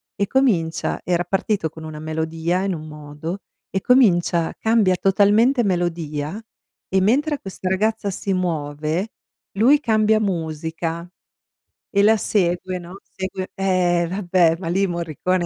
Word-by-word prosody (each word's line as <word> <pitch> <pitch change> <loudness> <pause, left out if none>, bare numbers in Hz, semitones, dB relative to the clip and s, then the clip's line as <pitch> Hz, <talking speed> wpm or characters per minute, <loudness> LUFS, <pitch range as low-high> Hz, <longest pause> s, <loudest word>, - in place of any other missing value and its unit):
E 200 - -1
comincia 185 -11 +1
era 175 -1 0
partito 195 -1 -1
con 160 +1 -12
una 155 -1 -7
melodia 160 +3 -2
in 195 -1 0
un 155 -1 -7
modo, 150 +4 -7 0.3
e 190 - -2
comincia 175 -9 +3
cambia 220 -5 +3
totalmente 210 +7 +3
melodia. 175 -2 -2 0.5
E 190 0 +1
mentre 285 +9 +2
questa 190 -1 -5
ragazza 210 +2 0
si 195 +1 -2
muove, 160 +1 -2 0.4
lui 245 +9 +4
cambia 220 -4 +2
musica, 165 -2 -3 0.8
e 200 0 +2
la 220 +2 +5
segue, 185 -2 0
no, 180 +3 -11
segue 190 0 -6
ehm, 180 -3 +1
vabbè, 180 -3 +2
ma 170 - -6
lì 190 +4 +1
Morricone 175 +1 -1
185 Hz, 130 wpm, -21 LUFS, 165-200 Hz, 0.8 s, la